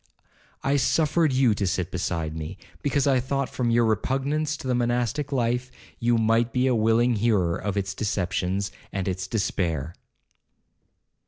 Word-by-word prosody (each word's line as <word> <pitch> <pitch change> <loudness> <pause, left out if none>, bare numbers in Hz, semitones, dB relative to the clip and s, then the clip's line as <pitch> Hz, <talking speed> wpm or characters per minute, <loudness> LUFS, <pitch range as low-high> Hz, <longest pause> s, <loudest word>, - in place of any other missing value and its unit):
I 140 +1 +2
suffered 155 +2 +2
you 130 -3 +4
to 100 -1 -1
sit 90 0 -1
beside 80 -3 -2
me, 80 +4 -6 0.2
because 145 -1 +1
I 135 -2 +4
thought, 135 +2 -1
from 120 -2 -1
your 115 0 +3
repugnance 140 +7 0
to 130 - -7
the 130 - +1
monastic 125 +4 0
life, 125 -1 0 0.3
you 120 0 +2
might 115 +1 +2
be 125 +1 +1
a 130 - +3
willing 115 +1 +3
hearer 100 -6 +2
of 100 0 -3
its 95 -1 -1
deceptions, 95 -1 -1 0.2
and 95 -1 -3
its 95 0 -2
despair.' 85 - -1
115 Hz, 155 wpm, -25 LUFS, 95-130 Hz, 0.3 s, you